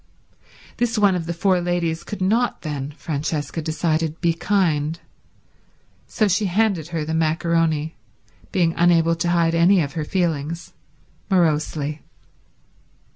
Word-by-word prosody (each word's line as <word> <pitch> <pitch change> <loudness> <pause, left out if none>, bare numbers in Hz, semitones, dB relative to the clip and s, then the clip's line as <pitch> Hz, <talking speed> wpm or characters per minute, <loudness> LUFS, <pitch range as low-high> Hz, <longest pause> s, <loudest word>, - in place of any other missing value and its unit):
This 240 -1 0
one 205 -2 +4
of 170 -2 -3
the - - -1
four 180 +1 +1
ladies 170 -2 -1
could 205 -3 -5
not 230 +6 +1
then, 145 -3 -4
Francesca 155 +1 -3
decided, 160 0 -1
be 170 -1 +2
kind; 165 -4 0 1.1
so 215 - +1
she 200 +2 +1
handed 190 -4 +1
her 165 -3 -3
the 160 - -3
macaroni, 160 -1 0 0.5
being 170 -3 +2
unable 170 -1 +3
to 170 +1 -1
hide 170 -1 +2
any 175 +3 +4
of 145 -4 -1
her 160 -3 -2
feelings, 165 -1 -2 0.6
morosely. 155 -4 0
165 Hz, 130 wpm, -22 LUFS, 155-180 Hz, 1.1 s, one